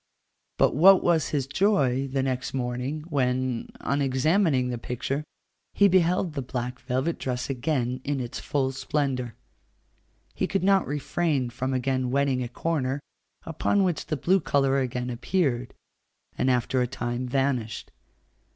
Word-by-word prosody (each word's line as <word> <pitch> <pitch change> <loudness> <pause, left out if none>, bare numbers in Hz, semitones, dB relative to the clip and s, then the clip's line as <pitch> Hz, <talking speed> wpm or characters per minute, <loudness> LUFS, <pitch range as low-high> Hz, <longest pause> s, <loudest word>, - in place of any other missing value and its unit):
But - - +3
what 185 +6 +7
was 165 -3 +2
his 140 -4 -1
joy 140 -5 +2
the 135 0 -1
next 130 0 -2
morning, 125 +4 -2
when, 130 -5 -1
on 140 +3 0
examining 135 0 +2
the 120 -1 -3
picture, 130 +5 -3 0.5
he 200 - +6
beheld 180 -2 +2
the 140 - -3
black 125 0 -4
velvet 130 +6 -2
dress 125 +1 -2
again 130 -2 -1
in 145 -1 -1
its 120 -1 -5
full 135 -2 -1
splendour. 130 -2 -2 1.0
He - - -1
could 195 -2 -1
not 195 -1 +3
refrain 145 -2 -1
from 130 +2 -3
again 130 0 0
wetting 135 -1 +1
a 120 - -3
corner, 140 -1 -1 0.5
upon 180 +5 +1
which 175 -4 -1
the 155 - -1
blue 185 +7 +3
colour 135 -4 +2
again 125 -1 -2
appeared, 125 -2 -1 0.6
and 130 - +1
after 125 +1 +1
a 125 - +1
time 120 0 -3
vanished. 130 -4 -1
135 Hz, 145 wpm, -26 LUFS, 125-150 Hz, 1.0 s, what